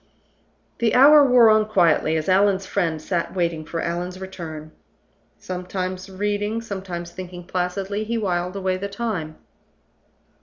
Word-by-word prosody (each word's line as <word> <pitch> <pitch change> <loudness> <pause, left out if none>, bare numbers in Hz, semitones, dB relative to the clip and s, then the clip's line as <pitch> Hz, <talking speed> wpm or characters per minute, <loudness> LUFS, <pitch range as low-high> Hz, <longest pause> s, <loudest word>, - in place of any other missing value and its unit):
The 235 -2 +2
hour 290 +3 +8
wore 245 -4 +6
on 215 0 +3
quietly 170 -5 +3
as 155 - -3
Allan's 195 0 +3
friend 170 -5 -1
sat 170 +3 -3
waiting 170 -3 -1
for 165 +1 -4
Allan's 180 +2 -3
return. 160 -5 -8 0.7
Sometimes 185 +1 -5
reading, 205 +3 -2
sometimes 190 -6 -6
thinking 180 -1 -8
placidly, 190 +3 -2
he 230 +2 -2
whiled 180 -3 -2
away 190 -1 -1
the 200 +2 -5
time. 200 -8 -4
185 Hz, 130 wpm, -22 LUFS, 175-205 Hz, 0.7 s, hour